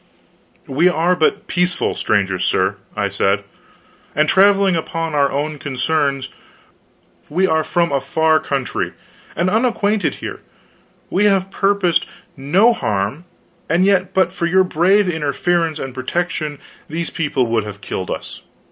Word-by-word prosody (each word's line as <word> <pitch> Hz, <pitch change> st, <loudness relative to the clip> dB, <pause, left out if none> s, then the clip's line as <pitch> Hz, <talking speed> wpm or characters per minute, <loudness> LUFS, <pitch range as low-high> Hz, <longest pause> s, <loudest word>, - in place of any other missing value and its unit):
"We 155 Hz, +7 st, +3 dB
are 175 Hz, +1 st, +2 dB
but 205 Hz, +5 st, +1 dB
peaceful 180 Hz, -1 st, 0 dB
strangers, 95 Hz, -3 st, 0 dB
sir," 95 Hz, +2 st, +1 dB, 0.2 s
I 100 Hz, -1 st, 0 dB
said, 100 Hz, +1 st, 0 dB, 0.7 s
"and 150 Hz, +1 st, +3 dB
traveling 195 Hz, 0 st, +4 dB
upon 165 Hz, 0 st, -3 dB
our 140 Hz, -1 st, +2 dB
own 150 Hz, +1 st, -2 dB
concerns. 140 Hz, -1 st, -1 dB, 1.0 s
We 180 Hz, +6 st, +2 dB
are 160 Hz, -4 st, +2 dB
from 170 Hz, -2 st, 0 dB
a 140 Hz, -1 st, +1 dB
far 160 Hz, +3 st, +2 dB
country, 140 Hz, -4 st, -3 dB, 0.4 s
and 175 Hz, -, 0 dB
unacquainted 215 Hz, -1 st, +1 dB
here. -, -, -7 dB, 0.7 s
We 200 Hz, +3 st, +2 dB
have 195 Hz, -2 st, +2 dB
purposed 195 Hz, -4 st, +1 dB, 0.3 s
no 185 Hz, -, +3 dB
harm; 105 Hz, -, -2 dB, 0.4 s
and 170 Hz, +4 st, +3 dB
yet 190 Hz, -2 st, +2 dB
but 190 Hz, -, +3 dB
for 170 Hz, -, -2 dB
your 190 Hz, +2 st, +4 dB
brave 185 Hz, +4 st, +3 dB
interference 160 Hz, +1 st, 0 dB
and 135 Hz, -3 st, -6 dB
protection 155 Hz, +3 st, -3 dB, 0.3 s
these 165 Hz, +2 st, -3 dB
people 145 Hz, -5 st, 0 dB
would 115 Hz, -2 st, 0 dB
have 100 Hz, -1 st, -8 dB
killed 95 Hz, -3 st, -5 dB
us. -, -, -6 dB
160 Hz, 140 wpm, -19 LUFS, 140-185 Hz, 1.0 s, traveling